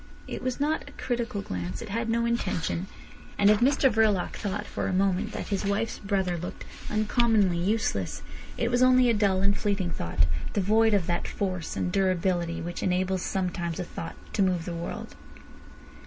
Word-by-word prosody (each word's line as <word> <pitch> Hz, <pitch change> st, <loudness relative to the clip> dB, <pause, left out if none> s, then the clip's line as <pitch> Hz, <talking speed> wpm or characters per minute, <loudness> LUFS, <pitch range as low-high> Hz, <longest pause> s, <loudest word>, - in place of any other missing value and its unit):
It -, -, -5 dB
was 255 Hz, +1 st, -2 dB
not 295 Hz, 0 st, 0 dB
a -, -, -17 dB
critical 235 Hz, -5 st, -2 dB
glance. 90 Hz, 0 st, -4 dB
It -, -, -7 dB
had 230 Hz, +3 st, -2 dB
no 235 Hz, +1 st, +2 dB
intention. 190 Hz, -6 st, -1 dB, 0.5 s
And 205 Hz, +1 st, +6 dB
if 210 Hz, -, +4 dB
Mr 270 Hz, +3 st, +4 dB
Verloc 215 Hz, -6 st, +2 dB
thought 205 Hz, -1 st, -3 dB
for -, -, -3 dB
a -, -, -1 dB
moment 195 Hz, +3 st, +1 dB
that -, -, -5 dB
his 200 Hz, -1 st, -1 dB
wife's 205 Hz, +3 st, -1 dB
brother 190 Hz, -4 st, 0 dB
looked 175 Hz, -, -7 dB, 0.2 s
uncommonly 215 Hz, -4 st, +2 dB
useless, 215 Hz, +6 st, -1 dB, 0.3 s
it 235 Hz, 0 st, 0 dB
was 245 Hz, +1 st, +2 dB
only 255 Hz, -1 st, +6 dB
a -, -, +2 dB
dull 200 Hz, -3 st, +2 dB
and 200 Hz, 0 st, +3 dB
fleeting 195 Hz, -4 st, -1 dB
thought, 85 Hz, -, 0 dB, 0.3 s
devoid 215 Hz, +2 st, +3 dB
of 190 Hz, -4 st, +1 dB
that 175 Hz, 0 st, -1 dB
force 185 Hz, -4 st, -3 dB
and 180 Hz, -, -1 dB
durability 180 Hz, -3 st, +1 dB
which 175 Hz, +1 st, -5 dB
enables 185 Hz, 0 st, +1 dB
sometimes 175 Hz, -3 st, -2 dB
a -, -, -1 dB
thought 165 Hz, -1 st, -7 dB, 0.2 s
to -, -, +1 dB
move 180 Hz, -3 st, +2 dB
the 175 Hz, -, -4 dB
world. 170 Hz, 0 st, -5 dB
195 Hz, 180 wpm, -27 LUFS, 180-225 Hz, 0.5 s, And